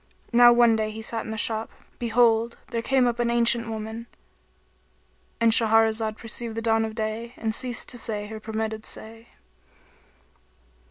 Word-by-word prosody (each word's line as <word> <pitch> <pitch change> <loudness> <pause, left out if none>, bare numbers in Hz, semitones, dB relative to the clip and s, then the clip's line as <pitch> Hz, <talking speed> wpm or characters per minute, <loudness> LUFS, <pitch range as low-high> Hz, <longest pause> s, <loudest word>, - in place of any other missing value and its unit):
Now 240 0 +8
one 235 -1 +5
day 220 -1 -1
as 215 - -7
he 220 - -6
sat 225 0 -3
in - - -7
the 220 - -4
shop, 220 0 -1 0.3
behold, 235 -1 +2
there 230 -2 -2
came 265 +1 +2
up 240 -1 -1
an 240 -1 +1
ancient 235 0 +2
woman.—And 60 - -7
Shahrazad 220 -1 +3
perceived 225 0 -5
the - - -1
dawn 225 -1 +2
of 220 0 -6
day 225 +2 -4
and 220 -1 -2
ceased 245 0 -2
to 245 - -4
say 210 -2 -3
her 220 +1 -8
permitted 220 0 -4
say. 225 +1 -8
225 Hz, 160 wpm, -25 LUFS, 215-235 Hz, 0.3 s, Now